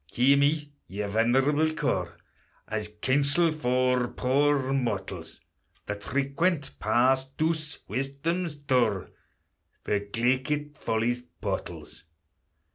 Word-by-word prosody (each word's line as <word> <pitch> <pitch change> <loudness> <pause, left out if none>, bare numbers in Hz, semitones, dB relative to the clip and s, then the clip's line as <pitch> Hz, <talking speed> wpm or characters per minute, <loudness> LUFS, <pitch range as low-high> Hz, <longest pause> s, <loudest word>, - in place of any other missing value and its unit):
Hear 130 +3 +5
me, 145 +1 +1 0.2
ye 105 +2 -4
venerable 135 +9 +2
core, - - -1 0.5
As 105 -1 -3 0.2
counsel 145 +5 +3
for 125 -3 +1
poor 135 +1 +1
mortals, 95 -10 -3 0.5
That 105 0 -5
frequent 140 - 0
pass 130 +2 +3
douce 155 -1 -1
Wisdom's 140 - -2
door, 125 -9 +1 0.7
For 105 - +1
glaikit 130 +8 -1
Folly's 120 -1 -1
portals! 125 - -6
130 Hz, 95 wpm, -27 LUFS, 120-145 Hz, 0.7 s, Hear